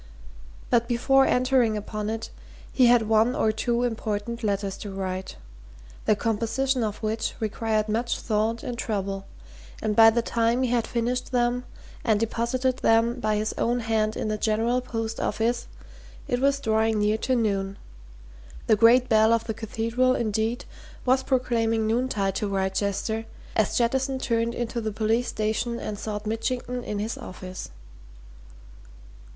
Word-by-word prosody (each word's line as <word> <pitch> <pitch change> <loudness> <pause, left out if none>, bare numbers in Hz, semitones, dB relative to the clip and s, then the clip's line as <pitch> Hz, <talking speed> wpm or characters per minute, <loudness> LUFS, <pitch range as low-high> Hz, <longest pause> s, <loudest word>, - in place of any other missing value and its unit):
But 235 -1 +3
before 270 +3 +3
entering 250 -3 +2
upon 210 0 -4
it 225 0 -4 0.4
he 255 -3 +5
had 235 -2 +4
one 220 +3 +3
or 220 - +2
two 235 +2 0
important 225 0 -3
letters 200 -2 -1
to 205 - -7
write, 190 -1 -4 0.7
the 215 - +4
composition 235 +4 0
of 210 0 -4
which 220 +1 -1
required 220 0 -1
much 230 +3 -1
thought 220 +1 -1
and 240 -1 -5
trouble, 195 -3 -3 0.5
and 210 - -1
by 225 0 +9
the 235 +1 +1
time 235 +2 +1
he 250 - 0
had 235 -2 +1
finished 245 +2 -2
them, 245 0 +1 0.4
and 220 -3 +2
deposited 235 +3 0
them 230 +2 +2
by 215 -2 0
his 215 +1 -1
own 240 +1 +1
hand 220 -1 0
in - - -2
the 215 0 -2
General 230 +4 +1
Post 225 -2 -4
Office, 235 +2 -1 0.6
it 245 - 0
was 280 0 +3
drawing 220 -3 +1
near 210 +1 +1
to 260 - +1
noon 200 -4 0 0.9
the - - +4
great 235 +4 +5
bell 220 0 +4
of 230 -1 +2
the 220 - -3
Cathedral, 230 +4 0
indeed, 220 +1 -1 0.4
was 260 +1 +3
proclaiming 230 -4 +1
noontide 220 -4 0
to 210 - -1
Wrychester 200 +3 -1 0.3
as 220 -3 +1
Jettison 265 +3 +1
turned 235 -2 0
into 235 0 -3
the 215 -1 -2
police 225 +3 0
station 220 +2 -1
and 205 -1 -5
sought 210 -1 -4
Mitchington 245 +3 -2
in 210 - -4
his 220 +6 -3
office. 185 -5 -8
225 Hz, 150 wpm, -25 LUFS, 215-240 Hz, 0.9 s, by